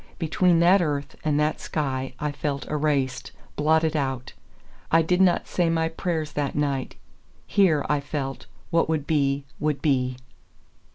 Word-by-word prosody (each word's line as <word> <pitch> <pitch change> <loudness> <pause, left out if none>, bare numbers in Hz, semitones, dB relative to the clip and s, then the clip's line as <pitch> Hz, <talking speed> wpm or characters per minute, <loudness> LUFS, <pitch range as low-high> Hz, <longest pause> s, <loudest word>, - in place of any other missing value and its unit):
Between 170 +1 +2
that 180 +3 +6
earth 145 -3 -2
and 150 -2 +1
that 150 +1 +1
sky 130 -4 -3
I 150 0 -1
felt 140 -1 -3
erased, 145 -4 -1 0.2
blotted 160 +1 +2
out. 135 -4 -2 0.6
I 165 0 +5
did 180 +3 +2
not 185 -2 +3
say 175 -2 +1
my 165 0 +1
prayers 165 -2 -3
that 145 -2 -2
night: 140 -3 -1 0.5
here, 170 -8 +3
I 150 - +1
felt, 140 -1 -5 0.2
what 165 -1 +2
would 155 -3 0
be 140 -3 +1
would 150 -2 0
be. 130 -4 +1
150 Hz, 150 wpm, -25 LUFS, 140-160 Hz, 0.6 s, that